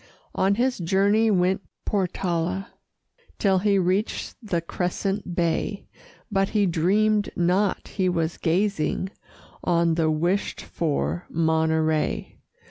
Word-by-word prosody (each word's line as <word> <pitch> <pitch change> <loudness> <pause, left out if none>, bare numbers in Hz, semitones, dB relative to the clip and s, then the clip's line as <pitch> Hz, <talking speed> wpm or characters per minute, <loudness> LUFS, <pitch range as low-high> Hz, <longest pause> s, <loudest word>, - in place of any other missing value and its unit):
On 195 +1 +2
his 250 +1 0
journey 200 +5 +3
went 190 -1 +2 0.2
Portala 185 -1 -1 0.7
Till 190 -2 +3
he 200 +1 +2
reached 190 +3 0
the 195 -7 -1
crescent 180 +2 -3
bay; 175 +4 -1 0.5
But 195 -1 +1
he 210 -2 +2
dreamed 205 +5 +2
not 180 +4 +1
he 185 -2 0
was 165 -2 -1
gazing 185 +1 0 0.5
On 170 -1 +2
the 160 -1 +1
wished 175 +6 0
for 85 - -2
Monterey. 160 -1 0
185 Hz, 110 wpm, -25 LUFS, 165-200 Hz, 0.7 s, journey